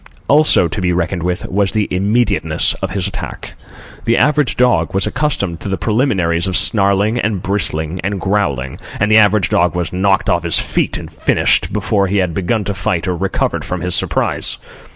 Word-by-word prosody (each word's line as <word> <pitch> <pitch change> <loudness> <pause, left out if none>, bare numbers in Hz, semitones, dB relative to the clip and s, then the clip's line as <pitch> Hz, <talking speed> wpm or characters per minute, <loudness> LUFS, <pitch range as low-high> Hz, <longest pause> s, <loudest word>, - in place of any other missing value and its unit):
Also 150 - +4
to 90 +4 -4
be 90 -1 +1
reckoned 85 +1 -1
with, 90 +1 -2
was 100 0 +1
the 110 -2 0
immediateness 105 +6 +1
of 95 - -2
his 95 -1 -2
attack. - - -7 0.5
The 115 - +2
average 150 0 +2
dog 120 -10 +2
was 95 - +1
accustomed 100 - -1
to - - -6
the 95 - -1
preliminaries 95 -8 0
of 95 - +1
snarling 100 +2 +3
and 105 -5 -2
bristling 90 -4 -2
and 100 +1 -2
growling, 85 -10 -1 0.2
and 105 +1 +1
the 110 - +7
average 105 -2 +3
dog 90 +1 +1
was 90 -1 -3
knocked 95 +1 +1
off 85 - +2
his 85 -1 +1
feet - - -1
and - - -9
finished - - +1
before 100 -2 0
he 100 +2 -1
had 90 -3 0
begun 100 +5 -1
to 100 - -3
fight 95 -2 -2
or 90 - 0
recovered 95 +2 -2
from 90 - -4
his 90 -1 -2
surprise. - - 0
95 Hz, 190 wpm, -16 LUFS, 90-105 Hz, 0.5 s, the